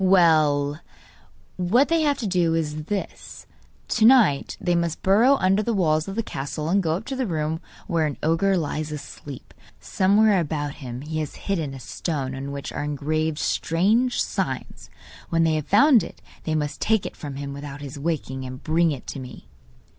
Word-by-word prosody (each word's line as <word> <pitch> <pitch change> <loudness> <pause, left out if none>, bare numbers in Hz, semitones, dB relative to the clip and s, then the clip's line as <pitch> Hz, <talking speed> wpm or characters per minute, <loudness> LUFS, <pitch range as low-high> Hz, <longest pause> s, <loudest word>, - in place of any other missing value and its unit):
'Well, 155 -6 +4 0.8
what 210 +10 +3
they 330 -1 +3
have 290 -2 +2
to 235 - -4
do 175 -3 +2
is 155 -1 -2
this: 200 +2 -5 0.4
To 220 - +1
night 225 - +4
they 175 - 0
must 170 -2 -1
burrow 225 +8 +5
under 195 -3 +2
the 230 +1 -1
walls 155 -3 +1
of 195 - -5
the 230 - -1
castle 150 -1 -4
and 195 +3 +3
go 160 -3 0
up 200 +6 -6
to 270 - -4
the 260 -2 -1
room 160 -2 -2 0.3
were 165 -3 +1
an 145 - -5
ogre 165 +5 +2
lies 155 -1 -3
asleep. 145 -2 -9 0.3
Somewhere 200 +1 +3
about 145 -3 -2
him 125 -1 -6
he 155 +2 -4
has 155 -2 -4
hidden 160 -9 -2
a - - -8
stone, 135 -1 -3
on 135 +1 -5
which 140 -1 -5
are - - -3
engraved 150 +2 -1
strange 210 +13 +1
signs. - - -4 0.4
When 165 0 +2
they 160 -1 +2
have 155 -2 -2
found 240 +3 +6
it 170 - -9 0.3
they 155 - 0
must 150 -1 -2
take 220 -3 +2
it - - -6
from 145 -4 -7
him 140 0 -5
without 140 0 -8
his 140 -1 -7
waking, 140 -4 -3
and 130 0 -8
bring 165 +1 +2
it 140 -5 -5
to - - -6
me. 125 -1 -10
160 Hz, 190 wpm, -24 LUFS, 145-195 Hz, 0.8 s, found